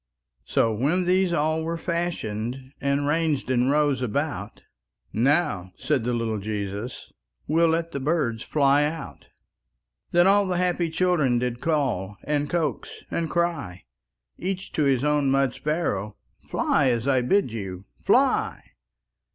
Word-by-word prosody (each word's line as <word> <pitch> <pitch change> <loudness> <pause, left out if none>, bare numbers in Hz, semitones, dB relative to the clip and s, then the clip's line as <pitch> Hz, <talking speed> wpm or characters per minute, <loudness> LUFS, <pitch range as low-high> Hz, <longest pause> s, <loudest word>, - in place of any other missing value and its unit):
So, 115 - +2
when 150 - +1
these 185 0 +2
all 155 0 +1
were 165 +1 -2
fashioned, 130 - -3
And 140 +1 +1
ranged 150 -3 0
in 125 +1 +2
rows 145 -2 +2
about, 120 -5 -3 0.5
"Now," 115 - +1
said 130 -3 0
the 125 - 0
little 115 -2 -1
Jesus, 105 +3 -5 0.3
"We'll 165 +2 +3
let 165 +1 0
the 140 - -3
birds 135 -6 0
fly 145 +1 +3
out." 160 +2 -6 0.8
Then 175 +1 +5
all 200 +1 +4
the 180 -1 0
happy 180 -1 +1
children 160 -7 +2
Did 120 0 -2
call, 125 - -1
and 145 0 -1
coax, 160 -7 -2
and 165 -1 -1
cry 170 - -2 0.6
Each 190 +1 -3
to 150 - +1
his 135 -2 +2
own 150 -2 +2
mud 135 -1 +2
sparrow: 105 - -2 0.3
"Fly, 135 - +2
as 120 +1 0
I 130 -2 +3
bid 160 - +2
you! 95 -4 -6 0.2
Fly!" - - +2
145 Hz, 140 wpm, -25 LUFS, 120-165 Hz, 0.8 s, Then